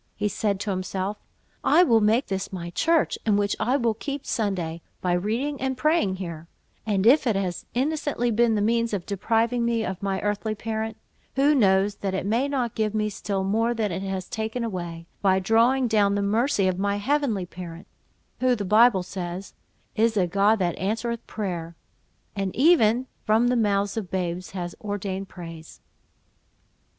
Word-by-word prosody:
He 210 - -1
said 200 -2 -1
to 205 - -2
himself—"I 190 - -1
will 230 -9 +4
make 220 +5 +3
this 195 -1 -3
my 175 -2 -5
church, 325 - +1
in 210 -2 +2
which 205 0 +1
I 255 +4 +2
will 235 -4 +1
keep 280 +5 -5
Sunday, 180 -7 -2 0.2
by 180 -1 0
reading 235 +10 -1
and 265 -1 -1
praying 305 - +2
here; 170 -3 -7 0.4
and 200 -2 +1
if 265 +3 +5
it 225 - +2
has 185 -3 -3
innocently 275 -3 0
been 230 0 +3
the 205 - +1
means 230 +1 +1
of 180 - -5
depriving 225 +4 0
me 230 -1 0
of 185 0 -4
my 195 -1 -1
earthly 210 +1 -1
parent, 220 0 -4 0.4
who 280 +3 +4
knows 200 -5 +3
that 195 -1 -2
it 190 - -2
may 230 +7 +1
not 255 -5 -1
give 215 -1 -1
me 215 0 0
still 195 -1 -2
more 225 +5 +1
than 215 -3 -1
it 180 +2 -3
has 190 -1 -4
taken 220 +2 -3
away, 175 -6 -5 0.2
by 190 -2 +4
drawing 230 +7 +3
down 205 -3 +3
the 200 - 0
mercy 210 0 +2
of 185 0 -1
my 200 +1 +1
heavenly 230 -3 0
parent, 170 -1 -9 0.5
who, 255 -1 +3
the 205 -3 -4
Bible 215 -1 +5
says, 180 0 -6 0.4
'is 225 0 +2
a 185 - +3
God 200 +5 +3
that 175 -4 0
answereth 225 +4 -2
prayer,' 175 -5 -4 0.6
and 195 -2 -2
even 255 -5 +4 0.2
'from 225 +3 +3
the 250 - +2
mouths 200 -3 +1
of 210 -5 -4
babes 180 -1 -3
has 175 -2 -5
ordained 195 -2 -4
praise.'" 165 -3 -10
210 Hz, 175 wpm, -25 LUFS, 190-235 Hz, 0.6 s, if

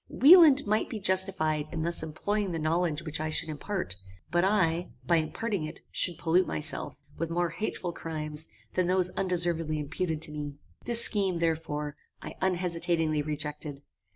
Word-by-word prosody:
Wieland 300 -2 +7
might 215 +1 0
be 220 - -5
justified 185 -6 +1
in 160 -2 -3
thus 170 +1 +1
employing 200 +6 -2
the - - -2
knowledge 160 0 0
which 155 -2 -2
I 155 0 -2
should 155 - 0
impart, 155 - -3 0.3
but 175 +1 +2
I, 180 -4 +1 0.2
by 170 - +3
imparting 195 +4 -2
it, 155 +2 -7
should 175 -3 +3
pollute 175 +3 +2
myself 155 0 -2 0.2
with 165 0 -2
more 170 0 -1
hateful 180 -2 -4
crimes 155 -2 -2 0.3
than 185 -1 +1
those 185 0 +2
undeservedly 170 -4 +1
imputed 155 +2 -3
to 150 - 0
me. 145 -1 -6 0.3
This 235 -1 +5
scheme, 195 -5 +2
therefore, 155 -3 -2 0.2
I - - -8
unhesitatingly 170 -4 0
rejected. 150 -1 -4
165 Hz, 155 wpm, -28 LUFS, 155-185 Hz, 0.3 s, Wieland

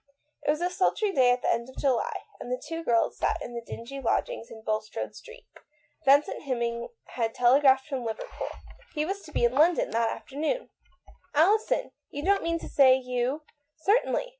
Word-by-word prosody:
It - - -3
was 305 +2 +2
a 355 +1 0
sultry 390 +3 +1
day 260 -8 +4
at 245 0 +2
the - - +3
end 235 +2 -3
of 260 - -15
July, 265 -4 0 0.2
and 245 - -7
the 250 - -1
two 330 +3 -6
girls 230 -6 +1
sat - - +1
in 240 - -7
the 235 - -4
dingy 235 +4 -8
lodgings 230 -1 -1
in 220 -1 -11
Bul 215 -1 0
strode 215 - -6
Street. - - -13 0.6
Vincent 280 +2 +4
Hemming 235 -3 -2 0.2
had 225 -2 -2
tele 250 +3 +5
graphed 265 -1 +5
from 270 -4 -3
Liverpool; 230 - -5 0.5
he 300 0 0
was 390 +4 -3
to 305 - -13
be - - 0
in 240 - +2
London 320 +6 +3
that 230 0 +1
afternoon. 315 - -3 0.3
" - - -24
Alison! 395 +9 +3 0.2
you 290 - -6
don't 395 +1 +3
mean 335 0 0
to - - -8
say 260 -2 +6
you 250 +3 -2
" 290 -1 -49
" 300 - -55
Certainly. - - +2
270 Hz, 205 wpm, -27 LUFS, 240-330 Hz, 0.6 s, say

